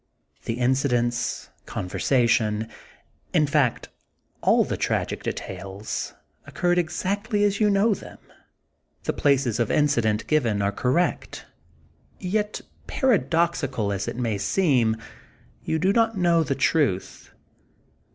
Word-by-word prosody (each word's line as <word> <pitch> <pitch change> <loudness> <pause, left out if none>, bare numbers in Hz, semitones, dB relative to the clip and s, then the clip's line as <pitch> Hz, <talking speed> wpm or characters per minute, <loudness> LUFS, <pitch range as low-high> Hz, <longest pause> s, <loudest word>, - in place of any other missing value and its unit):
The - - -1
incidents, 120 -2 0 0.2
conversation, 110 +1 +1 0.7
in 155 -3 +5
fact 140 -5 +1 0.5
all - - +4
the - - -3
tragic - - -1
details, 100 +2 -5 0.3
occurred 175 0 +1
exactly 205 +5 -1
as 200 -1 +1
you 210 -1 +4
know 205 +2 +3
them; - - -9 0.9
the - - -1
places 135 -5 +1
of 115 - +1
incident 120 -8 +2
given 120 -9 +1
are 100 0 +1
correct, 130 - -1 0.7
ŌĆö 180 -2 -5
yet, 210 0 -1 0.3
paradoxi 170 - +1
cal 105 -5 -1
as 100 0 -3
it - - -3
may 115 -5 -1
seem, 125 - +2 0.7
you 160 - -1
do 185 +5 +2
not 225 -1 +2
know 170 -2 +3
the 140 -3 -1
truth. 135 - 0
140 Hz, 120 wpm, -24 LUFS, 115-180 Hz, 0.9 s, in